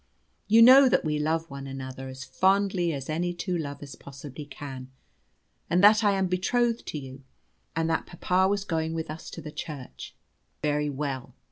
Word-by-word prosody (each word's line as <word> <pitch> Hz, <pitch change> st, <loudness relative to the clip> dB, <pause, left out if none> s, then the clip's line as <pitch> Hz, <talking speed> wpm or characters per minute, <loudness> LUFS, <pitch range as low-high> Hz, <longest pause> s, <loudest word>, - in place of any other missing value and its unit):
You 225 Hz, +2 st, +7 dB
know 260 Hz, +2 st, +9 dB
that -, -, +2 dB
we 150 Hz, -1 st, 0 dB
love 160 Hz, +2 st, 0 dB
one 140 Hz, 0 st, -7 dB
another 135 Hz, 0 st, -7 dB
as 130 Hz, 0 st, -8 dB
fondly 190 Hz, +2 st, +2 dB
as 135 Hz, -3 st, -5 dB
any 175 Hz, +3 st, -1 dB
two 180 Hz, +1 st, -2 dB
lovers 145 Hz, -3 st, -5 dB
possibly 140 Hz, +1 st, -10 dB
can, 135 Hz, -2 st, -8 dB, 0.8 s
and 180 Hz, +3 st, +2 dB
that 215 Hz, +2 st, +7 dB
I 205 Hz, -1 st, +4 dB
am 190 Hz, -1 st, +1 dB
betrothed 230 Hz, +6 st, 0 dB
to -, -, -4 dB
you, 135 Hz, -1 st, -9 dB, 0.5 s
and 165 Hz, 0 st, 0 dB
that 165 Hz, 0 st, -1 dB
papa 185 Hz, +2 st, +1 dB
was 200 Hz, 0 st, 0 dB
going 160 Hz, -3 st, -2 dB
with 160 Hz, -2 st, -4 dB
us 155 Hz, -, -8 dB
to 165 Hz, -, -9 dB
the 150 Hz, -, -7 dB
church. 150 Hz, -4 st, -8 dB, 0.5 s
Very 150 Hz, 0 st, +1 dB
well. 135 Hz, -2 st, -4 dB
160 Hz, 175 wpm, -27 LUFS, 140-185 Hz, 0.8 s, know